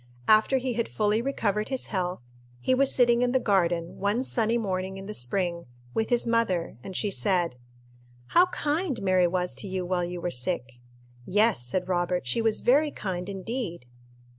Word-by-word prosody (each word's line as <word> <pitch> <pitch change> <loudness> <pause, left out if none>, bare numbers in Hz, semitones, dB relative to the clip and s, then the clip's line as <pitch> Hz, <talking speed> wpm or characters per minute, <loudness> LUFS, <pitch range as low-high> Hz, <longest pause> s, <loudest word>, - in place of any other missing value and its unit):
After 215 +5 +5
he 255 -1 -2
had 235 0 -2
fully 215 +1 +1
recovered 215 -5 -1
his 265 -2 -2
health, 180 -5 -2 0.4
he 255 - +1
was 270 +1 +4
sitting 240 -1 +4
in 250 0 +1
the 260 - +4
garden, 175 -6 0
one 205 +5 +1
sunny 230 -2 +1
morning 190 -3 -3
in 195 - -8
the 210 - -6
spring, 170 +4 -1 0.3
with 220 - -1
his 240 -1 +2
mother, 230 -7 0
and 190 - -8
she 205 - 0
said, 170 +2 +1 0.7
"How 360 +1 +5
kind 300 -4 -1
Mary 185 -2 +4
was 180 0 -1
to 205 - -5
you 185 -1 -3
while 180 0 0
you 175 0 -4
were 175 0 -2
sick!" 125 -2 -2 0.5
"Yes," 210 - +3
said 175 +10 -1
Robert, 180 -3 0
"she 125 - 0
was 225 -1 +1
very 290 +5 +4
kind 185 -7 -4
indeed." 195 - -4
195 Hz, 180 wpm, -27 LUFS, 180-235 Hz, 0.7 s, After